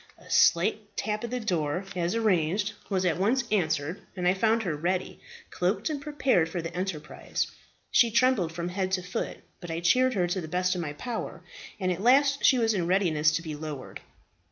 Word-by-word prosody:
A - - -15
slight - - +3
tap 215 0 -2
at 235 - -3
the 250 +1 -2
door, 180 -5 -1
as 175 +3 -1
arranged, 205 -1 +1 0.2
was 190 -2 0
at 175 -1 +1
once 235 +7 +2
answered, 160 -4 0
and 180 -2 -1
I 180 - +5
found 225 +3 +2
her 170 -6 -1
ready 180 +5 -2 0.3
cloaked 195 - 0
and 290 -2 -4
prepared 275 - +1
for 175 - -3
the 165 0 -5
enterprise. 175 -5 -3 0.5
She 235 - +5
trembled 235 -7 +2
from 170 +1 -4
head 185 +1 -2
to 185 -2 0
foot, 180 +1 -4 0.2
but 175 - -9
I 165 0 -2
cheered 255 +9 +3
her 180 -3 +2
to 175 +2 -2
the 160 - -6
best 180 +2 0
of 180 - -3
my 150 -3 -4
power, 235 +9 -5 0.4
and 185 -2 0
at 180 +1 -3
last 275 +4 +4
she 260 - +6
was 225 -2 +2
in 175 -4 -1
readiness 170 -5 +3
to 165 - -1
be 160 -2 -5
lowered. 150 -3 -7
185 Hz, 200 wpm, -27 LUFS, 170-220 Hz, 0.5 s, she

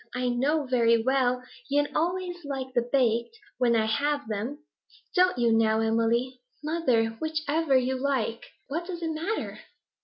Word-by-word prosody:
I 250 0 0
know 280 +5 +1
very 235 -3 +3
well 255 -1 +1 0.3
yen 290 +1 +1
always 355 +1 -1
like 265 -2 -5
the 240 -1 0
baked, 240 - +1 0.2
when 240 -2 +3
I 220 -1 +3
have 285 +4 0
them. 230 +8 -4 0.5
Don't 365 -3 +4
you, 235 -2 +3
now, 220 -1 +3
Emily?' 230 +3 +1 0.2
'Mother, 295 -8 +1
which 315 -1 -3
you 265 -4 +2
like! 255 -5 -1 0.2
What 335 +5 -3
does 350 -2 -5
it 325 - -1
matter?' 335 +8 -3
260 Hz, 150 wpm, -27 LUFS, 235-310 Hz, 0.5 s, Don't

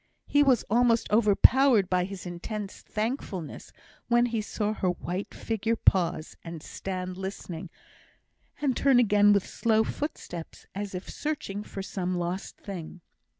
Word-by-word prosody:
He 290 - +3
was 265 -5 +4
almost 235 +1 +3
overpowered 225 +1 +5
by 180 -1 +1
his 195 -1 -7
intense 195 +4 -5
thankfulness 215 - -4 0.4
when 240 0 +4
he 230 -2 -1
saw 210 0 -2
her 190 -4 0
white 180 +2 -3
figure 225 +1 -1
pause, 175 -6 +2
and 165 -2 -7
stand 185 -1 -5
listening, 190 -3 -6 0.9
and 275 -4 +1
turn 270 0 +4
again 205 -3 +5
with 200 -2 +3
slow 220 -1 +2
footsteps, 220 - -6
as 200 -1 -4
if 180 - -6
searching 290 -10 -3
for 195 -2 -6
some 185 -2 -2
lost 175 +2 -3
thing. 180 -3 -8
205 Hz, 140 wpm, -28 LUFS, 180-230 Hz, 0.9 s, overpowered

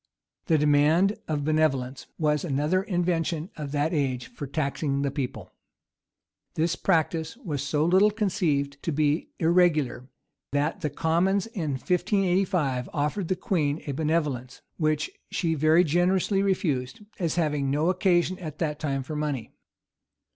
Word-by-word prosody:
The 160 - +4
demand 150 +7 +4
of 150 -2 -1
benevolence 140 -4 0
was 150 -2 +1
another 155 +3 +1
invention 175 -2 -1
of 145 -3 -6
that 150 +3 0
age 130 -5 -1
for 150 -11 -6
taxing 140 0 -1
the 140 - 0
people. 125 -9 -5 1.0
This 165 +2 +1
practice 165 +1 0
was 160 - -4
so 150 +2 0
little 190 +5 +5
conceived 155 -9 -1
to 165 - -2
be 150 +1 +1
irregular, 160 -7 +2 0.4
that 145 +3 0
the 150 - -1
commons 170 +6 +1
in 180 - -3
1585 180 - 0
offered 150 +6 -1
the 185 - +1
queen 160 -9 -1
a 145 - -3
benevolence; 145 -4 -2
which 155 -1 0 0.2
she 165 -3 0
very 155 +3 +4
generously 180 +4 +2
refused, 155 -9 -1 0.2
as 170 -4 0
having 150 -5 0
no 150 +6 +2
occasion 185 0 +1
at 155 -4 -7
that 150 -3 -2
time 135 -3 -2
for 150 +4 -6
money. 145 -7 -3
155 Hz, 140 wpm, -26 LUFS, 145-175 Hz, 1.0 s, little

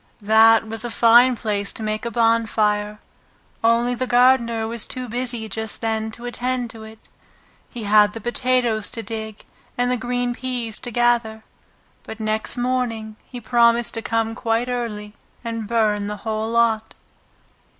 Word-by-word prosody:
That 220 +1 +5
was 225 +1 -1
a 240 - -3
fine 240 +2 +5
place 205 -3 -2
to 220 - -7
make 215 +1 -3
a - - -1
bonfire, 215 -2 +1 0.6
only 235 +2 +3
the 255 +1 -3
gardener 240 -2 +3
was 230 -1 -5
too 255 -1 -5
busy 240 -1 -2
just 220 +1 -5
then 220 -1 -2
to 240 - -9
attend 245 0 -2
to 225 - -11
it. 220 0 -13 0.6
He 235 - -7
had 210 0 +4
the 225 - -6
potatoes 240 -2 0
to 230 - -5
dig 220 -2 -7 0.3
and 245 0 +1
the 250 - +1
green 245 +1 -2
peas 240 -3 -3
to 245 - -5
gather, 235 -2 +1 0.6
but 220 - -10
next 220 +2 -1
morning 240 -3 -2
he 250 - -8
promised 235 0 +2
to 225 - -3
come 225 0 -1
quite 230 +1 -1
early 215 -4 -4 0.3
and 230 -2 -4
burn 210 -3 +1
the 210 0 -4
whole 220 0 -2
lot. 230 -1 +1
230 Hz, 160 wpm, -21 LUFS, 220-240 Hz, 0.6 s, That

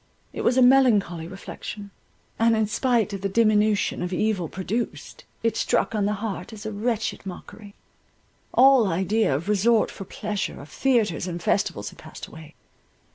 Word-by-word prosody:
It - - -4
was 245 - +2
a 260 - +6
melancholy 215 -11 +4
reflection; 200 +2 -8 0.5
and 230 0 +4
in 220 0 +2
spite 225 -1 0
of 195 - -5
the 195 - -1
diminution 215 -1 +2
of 180 0 -3
evil 185 -3 0
produced, 205 +5 -4 0.2
it 230 - +1
struck - - 0
on 205 -2 +1
the 210 - 0
heart 195 -1 -5
as 215 -1 -10
a 220 - -3
wretched 220 +1 -2
mockery. 200 +2 -10 0.8
All 265 -4 +6
idea 190 -1 +1
of 155 +7 -4
resort 210 +2 +3
for 195 - -9
pleasure, 210 +1 -4
of 145 - -11
theatres 220 - +1
and 175 -1 -4
festivals 135 - -1
had - - -18
passed - - -10
away. 160 -1 -13
210 Hz, 165 wpm, -24 LUFS, 185-225 Hz, 0.8 s, a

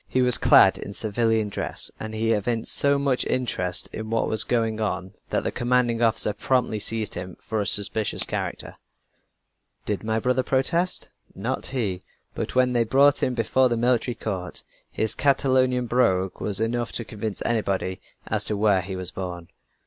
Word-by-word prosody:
He 130 - +1
was 125 -1 +5
clad - - +5
in 100 - -7
civilian 110 +1 0
dress - - -5
and 110 0 -6
he 115 +1 0
evinced 115 +1 +1
so 140 0 +4
much 140 -2 0
interest 95 -8 0
in 110 0 -6
what 115 0 0
was 110 -1 +2
going 115 -2 -1
on 95 -2 -3 0.2
that - - -1
the - - -2
commanding 120 -1 0
officer 115 -2 +1
promptly 125 -4 -1
seized 110 0 0
him 90 0 -7
for 110 -2 -3
a 100 - -2
suspicious 105 +1 +5
character. - - -5 1.1
"Did 105 -1 -3
my 110 0 -1
brother 125 +3 +1
protest? 165 +8 0 0.3
Not 115 +7 -3
he. 105 -9 -3 0.3
But - - -5
when 125 -1 +3
they 120 -1 +2
brought 140 +5 +3
him 125 - 0
before 125 +3 +2
the 120 - -1
military 120 0 +1
court, 95 -4 -5 0.3
his 110 - -1
Catalonian 130 -2 +1
brogue 95 -7 0
was 100 -2 -2
enough 120 +1 -2
to 115 - -3
convince 105 -1 -5
anybody 100 -5 -2 0.2
as - - -1
to 105 - -1
where 100 -2 +2
he 95 +1 -6
was 90 -1 -2
born. 90 -3 -7
115 Hz, 170 wpm, -24 LUFS, 100-125 Hz, 1.1 s, was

